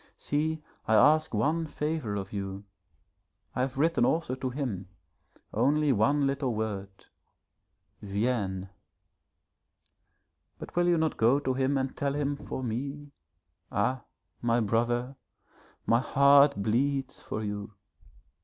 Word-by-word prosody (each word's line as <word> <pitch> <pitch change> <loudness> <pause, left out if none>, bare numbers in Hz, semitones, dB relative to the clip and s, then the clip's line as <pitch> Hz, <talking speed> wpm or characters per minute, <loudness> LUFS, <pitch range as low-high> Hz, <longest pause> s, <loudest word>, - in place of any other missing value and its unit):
See, 155 +1 -1 0.2
I 110 - +4
ask 155 +7 +5
one 155 +10 0
favour 150 -8 -2
of 100 0 -5
you 100 0 -4 0.9
I - - 0
have 130 0 -2
written 165 -1 +2
also 160 0 +1
to 130 0 -3
him, 120 -9 -4 0.6
only 150 0 +3
one 140 +6 +2
little 135 -3 -1
word 105 -3 -3 1.1
"Viens," 100 -2 -1 1.9
but - - -10
will 175 0 +3
you 175 -1 +4
not 160 -1 0
go 120 +5 +4
to 130 -2 0
him 135 +2 +1
and 135 0 -2
tell 140 0 -1
him 145 -1 0
for 130 -1 -6
me? 140 +5 -4 0.6
Ah, 125 +5 0 0.4
my 120 0 +2
brother, 120 +4 0 0.7
my 115 - +4
heart 140 0 +5
bleeds 135 +4 0
for 110 - -4
you. 105 0 -5
130 Hz, 125 wpm, -29 LUFS, 110-145 Hz, 1.9 s, ask